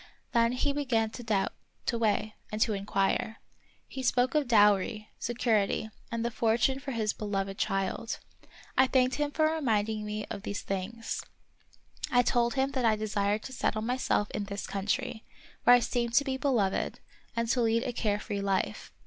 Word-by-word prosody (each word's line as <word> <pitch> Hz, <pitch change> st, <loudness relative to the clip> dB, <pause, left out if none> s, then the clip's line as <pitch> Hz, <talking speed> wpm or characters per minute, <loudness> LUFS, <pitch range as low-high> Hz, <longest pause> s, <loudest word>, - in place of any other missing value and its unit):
Then 235 Hz, 0 st, +3 dB
he 280 Hz, +3 st, 0 dB
began 240 Hz, -6 st, +1 dB
to 245 Hz, -, -7 dB
doubt, 210 Hz, -4 st, 0 dB, 0.3 s
to 240 Hz, -, 0 dB
weigh, 215 Hz, -1 st, +1 dB, 0.2 s
and 215 Hz, -, -3 dB
to 220 Hz, -, +3 dB
inquire. 200 Hz, +3 st, 0 dB, 0.5 s
He 265 Hz, -, -6 dB
spoke 250 Hz, 0 st, +2 dB
of 300 Hz, -3 st, +2 dB
dowry, 210 Hz, -1 st, +3 dB
security, 220 Hz, -3 st, 0 dB, 0.2 s
and 230 Hz, 0 st, -1 dB
the 235 Hz, -, 0 dB
fortune 230 Hz, +4 st, +2 dB
for 280 Hz, +1 st, -7 dB
his 220 Hz, -4 st, 0 dB
beloved 195 Hz, -2 st, -3 dB
child. 195 Hz, +4 st, -1 dB, 0.6 s
I 260 Hz, -, +5 dB
thanked 255 Hz, -1 st, +2 dB
him 295 Hz, 0 st, 0 dB
for 310 Hz, +2 st, +1 dB
reminding 220 Hz, -7 st, 0 dB
me 210 Hz, 0 st, -4 dB
of 200 Hz, -, -4 dB
these 205 Hz, 0 st, -4 dB
things. 195 Hz, +4 st, -3 dB, 0.9 s
I 245 Hz, 0 st, +5 dB
told 240 Hz, +1 st, +2 dB
him 270 Hz, 0 st, +1 dB
that 260 Hz, -2 st, -1 dB
I 225 Hz, -2 st, +4 dB
desired 210 Hz, 0 st, 0 dB
to 265 Hz, -, -7 dB
settle 215 Hz, -3 st, 0 dB
myself 245 Hz, -3 st, 0 dB
in 205 Hz, -1 st, -3 dB
this 200 Hz, 0 st, -5 dB
country, 220 Hz, +4 st, -2 dB, 0.4 s
where 245 Hz, -, +9 dB
I -, -, +5 dB
seemed 235 Hz, 0 st, -1 dB
to 285 Hz, -, +6 dB
be 265 Hz, -2 st, -1 dB
beloved, 245 Hz, -8 st, 0 dB, 0.4 s
and 230 Hz, 0 st, 0 dB
to 245 Hz, +1 st, +2 dB
lead 230 Hz, 0 st, +2 dB
a 250 Hz, -, -3 dB
care 210 Hz, -3 st, 0 dB
free 200 Hz, -1 st, -3 dB
life. 195 Hz, -1 st, -1 dB
225 Hz, 175 wpm, -30 LUFS, 210-250 Hz, 0.9 s, where